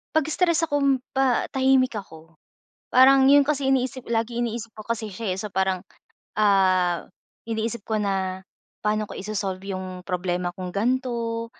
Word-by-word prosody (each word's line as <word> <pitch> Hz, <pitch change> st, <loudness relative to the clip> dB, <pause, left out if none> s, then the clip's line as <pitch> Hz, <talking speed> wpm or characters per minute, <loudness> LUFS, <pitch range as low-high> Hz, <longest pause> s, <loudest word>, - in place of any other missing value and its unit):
Pag-stress 330 Hz, +2 st, +2 dB
akong 280 Hz, -2 st, +2 dB, 0.2 s
pa 265 Hz, -2 st, +2 dB
tahimik 260 Hz, -2 st, +3 dB
ako, 165 Hz, -5 st, -9 dB, 0.6 s
parang 265 Hz, +1 st, +7 dB
'yon 285 Hz, 0 st, +7 dB
kasi 280 Hz, -3 st, +1 dB
iniisip, 260 Hz, -1 st, 0 dB
lagi 230 Hz, +1 st, -1 dB
iniisip 230 Hz, -1 st, -4 dB
ko 215 Hz, -, -9 dB
kasi 230 Hz, -1 st, -2 dB
siya, 195 Hz, 0 st, -3 dB
eh, -, -, -9 dB
so, 210 Hz, -, -4 dB
parang, 190 Hz, -1 st, 0 dB, 0.6 s
ah, 185 Hz, -4 st, +3 dB, 0.4 s
iniisip 225 Hz, 0 st, -3 dB
ko 220 Hz, -, -2 dB
na 190 Hz, -2 st, -2 dB, 0.4 s
paano 215 Hz, 0 st, 0 dB
ko -, -, -9 dB
i-so-solve 195 Hz, -2 st, -3 dB
'yong 185 Hz, -2 st, -6 dB
problema 180 Hz, -1 st, -1 dB
kong 185 Hz, -1 st, -6 dB
gan'to? 230 Hz, 0 st, -1 dB
220 Hz, 145 wpm, -24 LUFS, 190-260 Hz, 0.6 s, parang